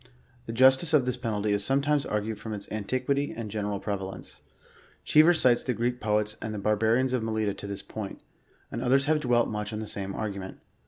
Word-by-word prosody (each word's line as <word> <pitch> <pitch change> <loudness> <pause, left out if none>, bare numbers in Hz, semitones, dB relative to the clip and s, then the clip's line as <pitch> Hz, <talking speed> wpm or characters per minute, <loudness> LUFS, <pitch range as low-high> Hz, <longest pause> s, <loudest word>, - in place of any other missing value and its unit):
The - - -3
justice 130 +6 +5
of 135 -4 +4
this 125 -1 0
penalty 110 -4 -2
is 100 -1 +1
sometimes 140 +4 +1
argued 105 0 -2
from 110 0 -6
its 100 -1 -5
anti 110 +4 -2
quity 140 +2 -1
and 110 -3 -5
general 105 -1 -2
prevalence. 95 -2 -5 0.6
Cheever 155 +3 +6
cites 125 -8 +3
the 125 - -1
Greek 120 +1 -1
poets 105 0 0
and 110 -1 -4
the - - -4
barbarians 110 +5 +2
of 125 - +1
Melita 110 -2 -1
to 100 - -8
this 100 0 -6
point, 105 -3 -7 0.5
and - - -4
others 135 +2 +3
have 155 +1 +2
dwelt 120 -4 +2
much 105 0 -4
on 105 - -4
the 110 - -4
same 100 -2 -5
argument. 100 -3 -5
110 Hz, 205 wpm, -27 LUFS, 105-130 Hz, 0.6 s, Cheever